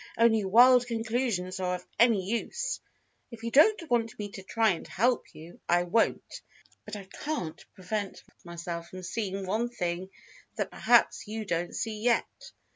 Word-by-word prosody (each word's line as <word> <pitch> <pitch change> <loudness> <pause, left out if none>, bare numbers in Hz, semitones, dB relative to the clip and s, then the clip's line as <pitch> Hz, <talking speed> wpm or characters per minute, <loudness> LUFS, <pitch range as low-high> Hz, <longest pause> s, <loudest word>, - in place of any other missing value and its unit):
Only 225 -2 +4
wild 245 +5 +6
conclusions 225 -5 -2
are 180 -1 0
of 180 - -9
any 225 -6 +4
use. 475 - -2 0.5
If 230 -2 -11
you 230 - -3
don't 340 - +5
want 230 -3 0
me 205 -1 -5
to 195 - -8
try 220 +2 +2
and 170 - -5
help 240 +4 0
you, 165 +3 -12
I 175 0 +4
won't. 215 +6 0 0.4
But - - -6
I 200 - -7
can't 195 - -5
prevent 200 +2 -4 0.2
myself 170 0 -6
from 185 0 -9
seeing 195 0 -3
one 220 +5 -1
thing 180 -4 -3 0.5
that - - -2
perhaps - - +3
you 215 +1 -4
don't 175 -2 -2
see 220 -2 -3
yet. 235 0 0
215 Hz, 160 wpm, -29 LUFS, 185-235 Hz, 0.5 s, wild